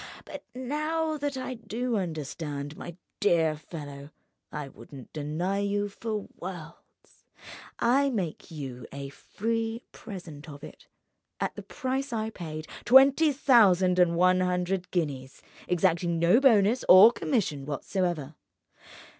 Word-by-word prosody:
But - - -9
now 305 +5 -2
that 285 -1 -2
I 255 0 -4
do 235 +1 -3
understand, 150 -5 -4
my 175 +1 -9 0.2
dear 165 -5 +3
fellow, 145 -2 -9 0.4
I 150 -2 -5
wouldn't 135 -2 -13
deny 160 +6 -2
you 205 0 -1
for 215 0 -5
worlds; 170 -3 -11 0.5
I 270 +4 +3
make 190 - -4
you 130 -6 -7
a 140 0 -6
free 225 - -3
present 165 -7 -10
of 145 0 -11
it, - - -12 0.5
at - - -2
the - - -8
price 265 -1 -3
I 220 -1 -2
paid—twenty 255 - +3
thousand 195 -10 +4
and 170 -1 +4
one 185 +1 +4
hundred 180 0 -1
guineas—exacting 165 +3 -2
no 170 +8 +4
bonus 230 -3 +4
or 195 +5 +10
commission 175 - -2
whatever. 155 0 -2
180 Hz, 120 wpm, -28 LUFS, 155-230 Hz, 0.5 s, or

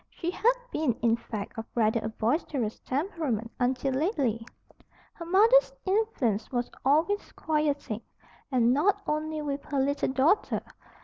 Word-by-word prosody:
She 345 0 -4
had 475 +6 +3 0.2
been, 300 -6 +1
in 230 -1 +4
fact, 225 -1 -6
of 225 - -5
rather 225 0 +2
a 220 - -3
boisterous 230 0 -1
temperament 270 - -2
until 260 +2 0
lately. 265 - 0 0.7
Her 335 - -8
mother's 445 +8 +5
influence 375 - 0
was 245 -1 -2
always 320 +10 +2
quieting, 290 -8 -1 0.5
and 245 -2 +4
not 395 +8 +2
only 305 0 -2
with 280 -1 -3
her 285 -2 -1
little 280 +2 +1
daughter. 275 +9 +2
280 Hz, 135 wpm, -28 LUFS, 235-330 Hz, 0.7 s, mother's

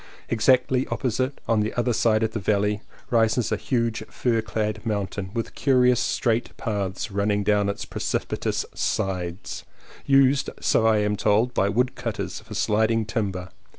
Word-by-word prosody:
Exactly 125 +3 +3
op - - -4
posite, 130 +2 0
on 115 -1 +2
the 105 +1 -1
other 120 0 +1
side 110 -1 +2
of 110 - 0
the 110 - -3
valley, 105 +1 +1 0.3
rises 115 0 +2
a - - +3
huge 115 +1 -1
fir 115 -3 0
clad 110 -1 -3
mountain, 100 -3 -3
with 115 - -3
curious 125 -3 +3
straight 115 -1 0
paths 100 -1 -3
running 100 +1 +1
down 105 0 +2
its 100 - -4
precipitous - - -2
sides, 90 -1 -3 0.4
used, 135 0 +4
so 110 - +2
I 110 -1 +4
am 105 0 +1
told, 110 +5 +2
by 100 - +2
woodcutters 120 +1 -2
for 110 0 -10
sliding 110 +2 +2
timber. 95 -5 -3
110 Hz, 150 wpm, -24 LUFS, 105-120 Hz, 0.4 s, used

